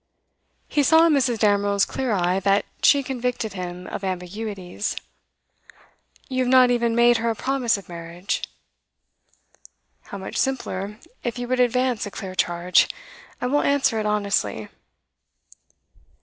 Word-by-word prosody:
He 295 Hz, -, +1 dB
saw 320 Hz, +4 st, +6 dB
in 330 Hz, -, +4 dB
Mrs. 260 Hz, -4 st, +2 dB
Damerel's 205 Hz, -1 st, +2 dB
clear 260 Hz, -3 st, -3 dB
eye 185 Hz, -1 st, +1 dB
that 200 Hz, +1 st, +2 dB, 0.2 s
she 280 Hz, -1 st, +5 dB
convicted 250 Hz, -4 st, -3 dB
him 180 Hz, -1 st, -6 dB
of 195 Hz, -, -6 dB
ambiguities. 190 Hz, +1 st, -4 dB, 1.3 s
'You 255 Hz, -2 st, 0 dB
have 250 Hz, -, 0 dB
not 255 Hz, -1 st, +6 dB
even 235 Hz, -1 st, +1 dB
made 240 Hz, 0 st, +5 dB
her 230 Hz, +1 st, -1 dB
a 225 Hz, -, -1 dB
promise 255 Hz, -1 st, 0 dB
of 200 Hz, -, -11 dB
marriage?' 170 Hz, +2 st, -4 dB, 1.6 s
'How 200 Hz, -, -8 dB
much 190 Hz, -, -6 dB
simpler, 210 Hz, -6 st, -2 dB, 0.3 s
if 240 Hz, 0 st, -3 dB
you 245 Hz, 0 st, -4 dB
would 255 Hz, +1 st, 0 dB
advance 250 Hz, -2 st, +1 dB
a -, -, -5 dB
clear 190 Hz, -1 st, -7 dB
charge. 175 Hz, 0 st, +2 dB, 0.5 s
I -, -, -3 dB
will 285 Hz, +4 st, +2 dB
answer 275 Hz, -5 st, +2 dB
it 215 Hz, -, -1 dB
honestly. 200 Hz, -, -1 dB
220 Hz, 140 wpm, -23 LUFS, 190-250 Hz, 1.6 s, saw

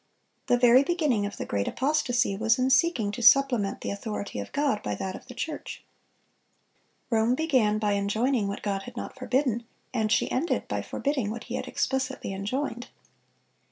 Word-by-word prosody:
The 245 Hz, -, +4 dB
very 245 Hz, +2 st, +6 dB
beginning 285 Hz, -, +1 dB
of 205 Hz, -, -8 dB
the -, -, -4 dB
great 100 Hz, -1 st, -1 dB
apostasy 250 Hz, -6 st, +1 dB
was 225 Hz, +3 st, +2 dB
in 260 Hz, +1 st, +1 dB
seeking 255 Hz, -8 st, +3 dB
to 240 Hz, -, -6 dB
supplement 240 Hz, -4 st, +4 dB
the -, -, -3 dB
authority 200 Hz, -, -5 dB
of 100 Hz, -, -6 dB
God 280 Hz, -7 st, 0 dB
by 105 Hz, -1 st, -3 dB
that 190 Hz, -, -4 dB
of -, -, -11 dB
the 250 Hz, -, -10 dB
church. 305 Hz, +3 st, -5 dB, 1.3 s
Rome 225 Hz, +2 st, +3 dB
began 255 Hz, -9 st, +2 dB
by 210 Hz, -1 st, 0 dB
enjoining 215 Hz, +3 st, +1 dB
what 200 Hz, -, -5 dB
God 195 Hz, -2 st, -1 dB
had 245 Hz, +4 st, -11 dB
not -, -, -5 dB
forbidden, 255 Hz, -2 st, 0 dB, 0.3 s
and 220 Hz, -3 st, 0 dB
she -, -, +2 dB
ended 295 Hz, +7 st, 0 dB
by -, -, -2 dB
forbidding 275 Hz, -7 st, -2 dB
what 225 Hz, +2 st, -5 dB
He -, -, -8 dB
had -, -, -3 dB
explicitly 265 Hz, -6 st, -2 dB
enjoined. 240 Hz, +5 st, -3 dB
240 Hz, 175 wpm, -27 LUFS, 205-265 Hz, 1.3 s, very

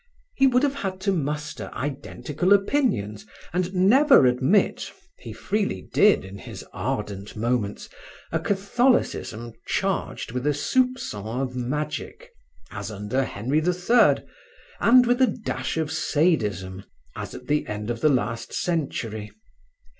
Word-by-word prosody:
He 270 Hz, -, +4 dB
would 250 Hz, +1 st, +3 dB
have 280 Hz, -1 st, +2 dB
had 195 Hz, -9 st, -4 dB
to 195 Hz, -, +1 dB
muster 150 Hz, -3 st, -3 dB
identical 145 Hz, +5 st, -1 dB
opinions 195 Hz, -, +1 dB, 0.3 s
and 180 Hz, +1 st, 0 dB
never 215 Hz, -, +6 dB
admit 130 Hz, +11 st, +2 dB, 0.3 s
(he -, -, -8 dB
freely 205 Hz, 0 st, -2 dB
did 205 Hz, -, +5 dB
in 95 Hz, +1 st, -9 dB
his -, -, -9 dB
ardent 100 Hz, 0 st, -4 dB
moments) 110 Hz, -2 st, -1 dB, 0.4 s
a -, -, 0 dB
Catholicism 200 Hz, -, 0 dB
charged -, -, -2 dB
with 125 Hz, +3 st, -2 dB
a 150 Hz, -, +2 dB
soupcon 135 Hz, -, -1 dB
of 125 Hz, -1 st, -5 dB
magic, 130 Hz, +4 st, -4 dB, 0.4 s
as -, -, -5 dB
under 105 Hz, +5 st, -1 dB
Henry 125 Hz, +6 st, -1 dB
the 175 Hz, +3 st, +1 dB
Third, 225 Hz, +7 st, +4 dB, 0.5 s
and 250 Hz, +1 st, +6 dB
with 245 Hz, +2 st, +2 dB
a 260 Hz, -, +6 dB
dash 220 Hz, -8 st, -3 dB
of 160 Hz, -2 st, -1 dB
sadism, 105 Hz, -, 0 dB, 0.3 s
as -, -, -6 dB
at -, -, -10 dB
the 150 Hz, 0 st, 0 dB
end 105 Hz, +2 st, -4 dB
of 115 Hz, -1 st, -5 dB
the 155 Hz, -, +5 dB
last 115 Hz, -3 st, -1 dB
century. 115 Hz, -11 st, -2 dB
150 Hz, 135 wpm, -24 LUFS, -, 0.5 s, never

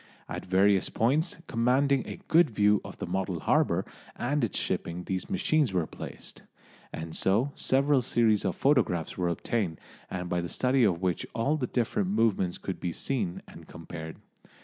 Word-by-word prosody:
At -, -, -6 dB
various 95 Hz, +1 st, +3 dB
points 145 Hz, +10 st, +1 dB
commanding 130 Hz, +3 st, +2 dB
a -, -, -7 dB
good 165 Hz, -1 st, +5 dB
view 105 Hz, -2 st, +3 dB
of -, -, -9 dB
the -, -, -4 dB
model 95 Hz, -1 st, -2 dB
harbour -, -, +2 dB, 0.3 s
and 140 Hz, +3 st, -1 dB
its 110 Hz, -, -1 dB
shipping 85 Hz, +1 st, -2 dB
these 95 Hz, 0 st, -3 dB
machines 155 Hz, -, +1 dB
were 90 Hz, -3 st, +1 dB
placed, -, -, -9 dB, 0.5 s
and 80 Hz, 0 st, -6 dB
so 110 Hz, +9 st, +2 dB
several 135 Hz, +1 st, +2 dB
series 115 Hz, -3 st, +2 dB
of 95 Hz, -4 st, -1 dB
photographs 120 Hz, -, +1 dB
were 90 Hz, -2 st, 0 dB
obtained, 85 Hz, -1 st, -2 dB, 0.4 s
by 90 Hz, 0 st, -1 dB
the 85 Hz, -, -5 dB
study 130 Hz, 0 st, +2 dB
of 90 Hz, -3 st, 0 dB
which 90 Hz, -3 st, -1 dB
all 125 Hz, +6 st, +1 dB
the 130 Hz, -5 st, -2 dB
different 110 Hz, -6 st, 0 dB
movements 105 Hz, -4 st, +1 dB
could 95 Hz, -, -5 dB
be 90 Hz, -, -2 dB
seen 100 Hz, -2 st, -2 dB
and -, -, -13 dB
compared. 80 Hz, -1 st, -8 dB
105 Hz, 165 wpm, -28 LUFS, 90-130 Hz, 0.5 s, good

